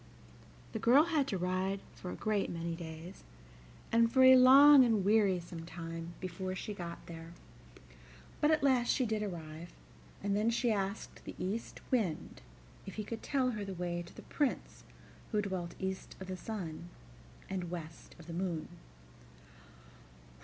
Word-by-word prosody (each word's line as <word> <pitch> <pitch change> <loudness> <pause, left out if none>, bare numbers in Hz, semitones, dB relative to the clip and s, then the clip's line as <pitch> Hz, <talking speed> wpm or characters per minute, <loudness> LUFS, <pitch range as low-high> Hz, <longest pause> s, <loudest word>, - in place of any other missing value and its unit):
The 220 - -3
girl 250 +8 +6
had 315 -5 +1
to 195 - -1
ride 185 +2 -1
for 180 - -8
a - - -5
great 215 -2 0
many 170 0 -3
days, 165 +1 -9 0.7
and 230 0 +4
for 260 +1 +5
a 260 0 +10
long 270 +2 +9
and 220 -6 +2
wearisome 185 -6 +2
time, 165 0 -7
before 185 0 -4
she 210 +3 -5
got 170 -3 -7
there; 165 0 -9 1.1
but 295 - +3
at 310 -2 +3
last 255 -3 +3
she 260 - +2
did 215 -1 -1
arrive, 170 -4 -6 0.5
and 200 0 +1
then 215 +2 +2
she 235 0 +1
asked 200 0 -3
the - - -8
East 205 +5 -4
Wind 200 - -1 0.5
if 195 - -7
he 215 - -3
could 225 +2 -6
tell 260 -3 +1
her 215 -3 -4
the 195 -1 -5
way 175 0 -2
to 170 - -12
the - - -10
Prince 290 -4 -2 0.5
who 210 - +1
dwelt 185 -3 -4
east 190 0 -4
of 190 - -6
the 185 - -3
sun 175 -5 -6 0.6
and 185 -3 -4
west 165 -2 -8
of 170 - -13
the 170 - -7
moon. 170 -3 -3
190 Hz, 160 wpm, -33 LUFS, 170-230 Hz, 1.1 s, a